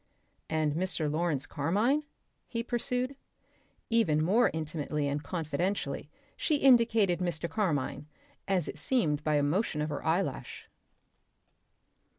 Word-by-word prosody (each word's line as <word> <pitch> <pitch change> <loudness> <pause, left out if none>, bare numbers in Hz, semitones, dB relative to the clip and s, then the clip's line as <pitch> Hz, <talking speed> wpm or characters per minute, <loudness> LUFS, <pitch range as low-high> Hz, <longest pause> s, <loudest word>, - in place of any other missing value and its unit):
"And 155 -2 +1
Mr. 165 -3 -1
Lawrence 155 -3 0
Carmine?" 210 - +1 0.4
he 230 -1 -3
pursued. 250 +2 -1 0.8
Even 220 -10 +3
more 215 +9 +4
intimately 155 -2 -2
and 145 +1 -1
confidentially 155 -1 -2 0.3
she 310 - +1
indicated 230 -9 +4
Mr. 170 -2 -2
Carmine, 155 -8 -1 0.4
as 190 -5 +1
it 155 - -6
seemed 150 - +1
by 155 -1 +1
a 145 - +3
motion 155 +2 0
of 150 +1 -1
her 145 - -4
eyelash. 170 +5 -2
170 Hz, 120 wpm, -30 LUFS, 150-220 Hz, 0.8 s, more